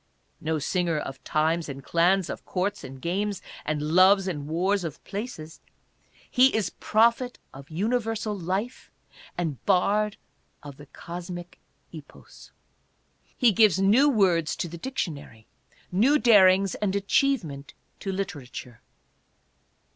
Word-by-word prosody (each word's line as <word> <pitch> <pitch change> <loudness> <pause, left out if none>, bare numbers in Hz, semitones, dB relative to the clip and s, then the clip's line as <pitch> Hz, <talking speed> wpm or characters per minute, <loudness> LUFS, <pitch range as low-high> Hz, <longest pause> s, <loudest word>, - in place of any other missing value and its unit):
' - - -44
' - - -42
No 160 - +1
singer 170 +2 -1
of 135 -2 -6
times 160 +1 0
and 135 0 -7
clans, 175 +5 +2
of - - -7
courts 190 +2 -3
and 130 0 -9
games, 195 +6 -2 0.2
and 150 -1 -2
loves 185 +5 +4
and 145 -6 -4
wars 185 +5 0
of 155 -3 -7
places, 195 -7 -7 0.7
he 255 +1 +5
is 205 -6 0
Prophet 235 +3 +1 0.2
of 135 +2 -12
Universal 220 +4 -1
Life 195 +6 -4 0.5
and 160 -8 -3
Bard 210 +3 +2 0.5
of 140 -2 -10
the 145 - -13
Cosmic 175 +2 -8 0.3
Epos. - - -14 0.9
He 245 -4 +5
gives 215 -4 +4
new 215 +10 +4
words 185 - +2
to - - -3
the 170 0 -9
dictionary, 155 - -5 0.5
new 240 +11 +4
darings 195 -6 +5
and 200 -2 -2
achievement 195 - 0 0.2
to 195 - -4
literature. 145 - -6
185 Hz, 130 wpm, -26 LUFS, 155-210 Hz, 0.9 s, he